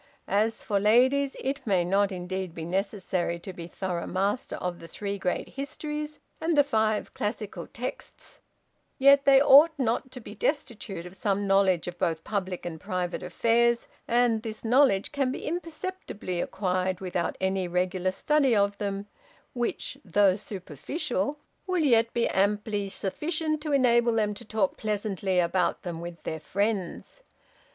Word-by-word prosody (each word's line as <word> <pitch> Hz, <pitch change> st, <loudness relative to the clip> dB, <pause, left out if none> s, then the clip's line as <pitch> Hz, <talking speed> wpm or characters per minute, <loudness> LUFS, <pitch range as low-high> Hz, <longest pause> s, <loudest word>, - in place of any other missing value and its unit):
As 215 Hz, +3 st, +1 dB
for 205 Hz, -2 st, +1 dB
ladies, 260 Hz, +7 st, +4 dB
it 270 Hz, +2 st, -2 dB
may 185 Hz, -4 st, +3 dB
not, 200 Hz, +2 st, +2 dB
indeed, 185 Hz, -1 st, -4 dB
be 160 Hz, -, -5 dB
necessary 185 Hz, -1 st, -1 dB
to 190 Hz, -, -7 dB
be 170 Hz, -1 st, -8 dB
thorough 175 Hz, -1 st, -3 dB
master 200 Hz, +6 st, -1 dB
of 180 Hz, -1 st, -4 dB
the 165 Hz, -, -10 dB
three 200 Hz, +4 st, -4 dB
great 180 Hz, -1 st, -2 dB
histories, 300 Hz, +2 st, -5 dB, 0.2 s
and 320 Hz, -1 st, +1 dB
the 290 Hz, -, +7 dB
five 220 Hz, -5 st, 0 dB
classical 205 Hz, -4 st, -4 dB
texts; 250 Hz, +3 st, -7 dB, 0.6 s
yet 275 Hz, +1 st, +6 dB
they 275 Hz, -1 st, +7 dB
ought 295 Hz, +3 st, +7 dB
not 255 Hz, 0 st, 0 dB
to 255 Hz, -, -9 dB
be 210 Hz, -3 st, -10 dB
destitute 215 Hz, -, -3 dB
of 180 Hz, +1 st, -10 dB
some 200 Hz, 0 st, 0 dB
knowledge 195 Hz, -3 st, +3 dB
of 175 Hz, 0 st, -6 dB
both 165 Hz, -3 st, 0 dB
public 185 Hz, -4 st, -3 dB
and 160 Hz, -2 st, -6 dB
private 180 Hz, -1 st, -2 dB
affairs, 235 Hz, +6 st, +2 dB, 0.2 s
and 235 Hz, -2 st, +3 dB
this 220 Hz, 0 st, -7 dB
knowledge 240 Hz, -5 st, +4 dB
can 275 Hz, -3 st, 0 dB
be -, -, -6 dB
imperceptibly 330 Hz, -, -4 dB
acquired 185 Hz, -1 st, -1 dB
without 180 Hz, -2 st, -2 dB
any 190 Hz, -1 st, 0 dB
regular 180 Hz, +1 st, 0 dB
study 270 Hz, +5 st, +2 dB
of 200 Hz, 0 st, +2 dB
them, 200 Hz, -1 st, -3 dB, 0.5 s
which, 240 Hz, -1 st, -3 dB
though 195 Hz, +1 st, +4 dB
superficial, 195 Hz, -, -3 dB, 0.3 s
will 365 Hz, -3 st, +1 dB
yet 230 Hz, -4 st, +4 dB
be 235 Hz, -, +1 dB
amply 205 Hz, +1 st, 0 dB
sufficient 310 Hz, -, -2 dB
to 305 Hz, -1 st, -3 dB
enable 240 Hz, -3 st, +4 dB
them 210 Hz, -2 st, +1 dB
to -, -, -10 dB
talk 210 Hz, -3 st, 0 dB
pleasantly 200 Hz, -3 st, -1 dB
about 175 Hz, 0 st, +1 dB
them 170 Hz, -2 st, -5 dB
with 170 Hz, -1 st, -8 dB
their 160 Hz, -, -4 dB
friends. 200 Hz, -, -2 dB
205 Hz, 155 wpm, -27 LUFS, 185-250 Hz, 0.6 s, the